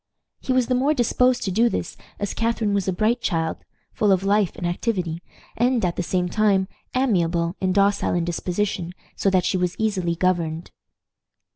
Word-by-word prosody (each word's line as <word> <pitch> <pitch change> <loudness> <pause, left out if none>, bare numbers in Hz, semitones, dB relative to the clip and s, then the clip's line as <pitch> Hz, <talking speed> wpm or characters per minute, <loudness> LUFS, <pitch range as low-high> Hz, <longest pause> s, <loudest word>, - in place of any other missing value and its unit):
He - - -3
was 255 -1 +3
the 255 - -1
more 275 +5 +2
disposed 250 0 +2
to 190 - -1
do 230 +5 +3
this - - -4 0.2
as 205 -2 -3
Catharine 225 -2 0
was 200 -2 0
a - - +2
bright 220 +6 +1
child, 165 -3 -1 0.4
full 210 -2 +2
of 190 -1 +2
life 200 -1 +2
and 175 - -5
activity, 175 -2 -2 0.3
and, 240 -2 +2
at 175 - -1
the - - -1
same 180 +1 0
time, 195 -1 +2 0.3
amiable 175 -9 +1
and 185 -1 +1
docile 200 0 +2
in 170 -1 0
disposition, 180 +1 -2 0.2
so 195 - +1
that 185 -2 +2
she - - +1
was 180 -1 -1
easily 190 -6 0
governed. 170 -2 -1
190 Hz, 180 wpm, -23 LUFS, 175-220 Hz, 0.4 s, was